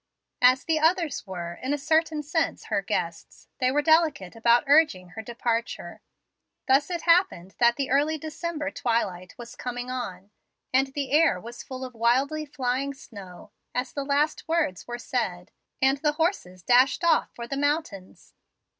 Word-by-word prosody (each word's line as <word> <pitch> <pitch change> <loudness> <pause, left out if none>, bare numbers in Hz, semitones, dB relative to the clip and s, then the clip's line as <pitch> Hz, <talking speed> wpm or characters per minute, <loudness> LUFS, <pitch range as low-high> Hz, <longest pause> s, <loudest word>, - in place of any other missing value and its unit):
As 255 +1 +5
the 320 -2 +1
others 320 - +1
were, 175 -2 -5
in 270 +3 -1
a - - -4
certain 315 +1 +1
sense, 320 +3 -2
her - - +2
guests, - - -4
they 255 -2 +2
were 295 +2 +1
delicate 315 - +2
about 235 +1 +4
urging 285 - +3
her 200 +5 -7
departure. 235 0 -3 0.7
Thus 275 +4 +3
it 345 -2 -3
happened 335 - +2
that 235 0 +5
the 275 -1 -3
early 295 +3 +2
December 310 -1 -4
twilight 195 -9 -2
was 240 -1 -10
coming 245 0 -5
on, 205 -6 -6 0.4
and 265 +1 +4
the 280 -2 -3
air 315 +1 +4
was 235 +1 -9
full 260 0 -7
of 255 - -9
wildly 265 +7 +1
flying 275 0 -2
snow, 200 -7 -12 0.2
as 250 +1 -2
the 280 - -3
last 290 +3 0
words 320 - -1
were 240 0 -4
said, 185 -8 -3 0.3
and 270 +1 +3
the 300 0 +1
horses 300 - -2
dashed 255 - +4
off 330 -2 +3
for 235 0 -7
the 275 - -3
mountains. 285 - -3
265 Hz, 165 wpm, -26 LUFS, 235-305 Hz, 0.7 s, As